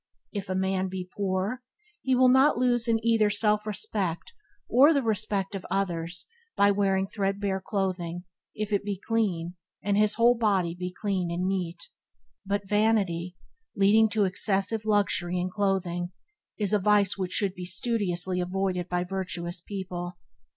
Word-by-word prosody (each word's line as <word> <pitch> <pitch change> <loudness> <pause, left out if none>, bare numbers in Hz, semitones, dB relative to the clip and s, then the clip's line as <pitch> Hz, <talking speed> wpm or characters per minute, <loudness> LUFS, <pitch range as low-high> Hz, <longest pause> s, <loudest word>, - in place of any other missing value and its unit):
If 200 -2 -5
a 185 - -1
man 190 0 0
be 185 -1 -5
poor, 200 +4 -1 0.4
he 260 -1 +1
will 255 0 +5
not 265 +2 +5
lose 240 -1 +2
in 225 -1 +2
either 225 -2 +4
self 210 0 +1
respect 195 - -3 0.3
or 285 +6 +6
the 280 - +2
respect 210 -3 -1
of 195 -1 -5
others 175 -3 -2 0.3
by 200 0 +5
wearing 195 -1 +1
threadbare 195 -1 -2
clothing 180 -4 -2 0.3
if 210 0 -3
it 200 - +1
be 200 -1 -3
clean 190 -6 -1 0.3
and 200 +1 +1
his 210 0 +3
whole 235 +2 +5
body 200 -7 +1
be 180 +1 -5
clean 185 -2 -2
and 175 +2 -2
neat. 185 - -3 0.6
But 200 0 -2
vanity, 195 -5 +1 0.4
leading 215 +3 +5
to 210 -2 +2
excessive 195 +3 +1
luxury 200 -4 +1
in 180 +1 -2
clothing, 185 -3 -1 0.5
is 205 -2 -1
a 210 - +4
vice 205 0 +3
which 185 -2 -3
should 200 -4 +1
be 180 -1 -7
studiously 185 -2 -1
avoided 180 -1 -2
by 180 0 0
virtuous 175 -2 -3
people. 180 -2 -6
195 Hz, 155 wpm, -27 LUFS, 180-210 Hz, 0.6 s, or